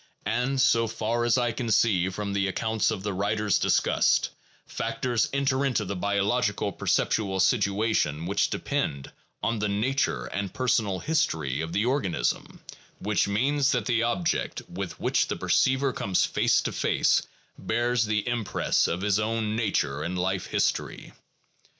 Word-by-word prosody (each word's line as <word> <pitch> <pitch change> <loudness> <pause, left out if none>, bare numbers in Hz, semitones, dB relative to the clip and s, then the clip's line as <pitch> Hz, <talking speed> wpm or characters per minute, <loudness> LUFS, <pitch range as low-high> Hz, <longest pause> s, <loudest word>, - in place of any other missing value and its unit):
And 125 +4 0
so 115 -2 +3
far 115 +2 -1
as 120 +1 +3
I 120 -1 +1
can 120 0 -4
see 100 -4 +3
from 100 +1 -4
the 100 -1 +1
accounts 110 +3 0
of 95 - -3
the 105 -1 -2
writers 105 +1 0
discussed, - - +2 0.3
factors 120 -3 -1
enter 140 -1 +1
into 125 -6 0
the 100 - -4
biological 100 +2 0
perceptual 95 0 0
situation 100 - +1
which 100 +3 +1
depend 70 -1 -3 0.3
on 115 -1 0
the 105 0 0
nature 125 +7 0
and 100 -1 -4
personal 110 -6 0
history 80 - 0
of 80 0 -4
the 105 +5 0
organism, 100 - -1 0.4
which 105 0 0
means 135 +7 +1
that 120 -5 -1
the 120 -1 +1
object 120 +9 -1
with - - -6
which - - +1
the - - -2
perceiver 130 0 +2
comes 95 -4 +1
face - - +2
to - - -3
face - - +2 0.4
bears 120 -1 0
the 105 0 -1
impress 120 -5 0
of 90 - -2
his 100 0 +1
own 110 0 -1
nature 75 -11 0
and 90 +3 -3
life 95 +1 -1
history. - - -2
110 Hz, 150 wpm, -26 LUFS, 100-120 Hz, 0.4 s, so